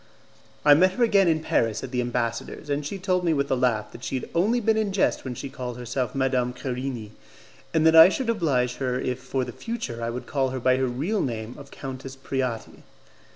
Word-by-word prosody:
I 145 - +9
met 185 +5 +4
her 240 - +1
again 200 -5 +4
in 160 -2 +2
Paris 115 -7 0
at 130 - -6
the 125 -1 0
ambassador's, 120 +3 -3
and 145 +1 0
she 150 +8 -4
told 185 -1 0
me 165 -2 +2
with 140 0 -1
a - - +4
laugh 125 -4 0
that 120 - -12
she - - -3
had - - -8
only 210 +8 +2
been 220 -1 +2
in 215 -2 0
jest 190 - +1
when 130 -2 -5
she 140 - -5
called 125 -3 -6
herself 125 0 -3
Madame 130 -2 +1
Querini, 125 -4 -4 0.6
and 160 -1 +2
that 160 0 +6
I 165 +2 +10
should 255 +5 -2
oblige 135 - 0
her 130 -2 -1
if 125 -1 -2
for 130 0 -2
the - - -6
future 225 - -5
I 115 - -1
would 125 +2 -5
call 135 -2 0
her 130 0 -4
by 130 +1 +3
her 130 0 +1
real 155 - -1
name 115 -2 -4
of 140 -1 -12
Countess 135 0 -7
Preati. 130 -3 -4
130 Hz, 225 wpm, -25 LUFS, 125-165 Hz, 0.6 s, I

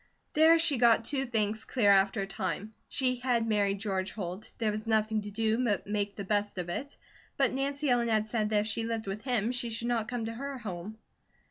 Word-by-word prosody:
There 320 +2 +6
she 320 -6 +3
got 230 -1 +5
two 270 0 -1
things 220 -2 -1
clear 210 -6 +3
after 195 +2 +3
a - - -1
time. 195 +2 -4 0.2
She 255 -1 0
had 245 -2 +1
married 200 -2 +1
George 195 -2 -2
Holt, 185 0 -5
there 220 -2 0
was 215 +2 -5
nothing 220 -1 +2
to 205 - -7
do 220 +3 0
but 210 -5 0
make 205 -1 -2
the 200 - -5
best 205 0 -1
of 175 -1 -3
it. 280 +11 -5 0.4
But 270 -2 +3
Nancy 280 +2 -1
Ellen 245 -2 +3
had 215 -2 +2
said 220 -1 -1
that 210 -1 +3
if 210 - -3
she 225 +1 -1
lived 225 -1 -3
with 195 +2 -4
him 240 -3 +1
she 245 -1 -1
should 230 +1 -2
not 230 -2 0
come 245 -1 -3
to 225 - -4
her 275 +3 -5
home. 210 -2 -6
220 Hz, 225 wpm, -30 LUFS, 205-245 Hz, 0.4 s, There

